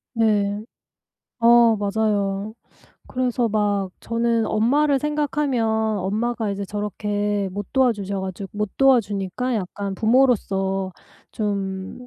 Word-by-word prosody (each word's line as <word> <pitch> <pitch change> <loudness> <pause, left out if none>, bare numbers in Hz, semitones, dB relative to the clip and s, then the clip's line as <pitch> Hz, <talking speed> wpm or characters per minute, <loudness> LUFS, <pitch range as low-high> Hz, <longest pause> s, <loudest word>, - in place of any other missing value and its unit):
네. 210 -2 +2 0.8
어 235 -1 +6
맞아요. 205 0 -1 0.6
그래서 250 -2 0
막 205 -3 0
저는 230 -1 0
엄마를 275 +6 +2
생각하면 295 -4 0 0.3
엄마가 220 +3 -1
이제 200 0 -3
저렇게 205 0 -2
못 200 +1 -6
도와주셔 210 -7 +1
가지고 190 +1 -5
못 210 -1 -1
도와주니까 240 -2 +2
약간 200 0 -4
부모로서 195 -5 +1 0.4
좀 200 +2 -4
210 Hz, 235 characters per minute, -22 LUFS, 200-235 Hz, 0.8 s, 어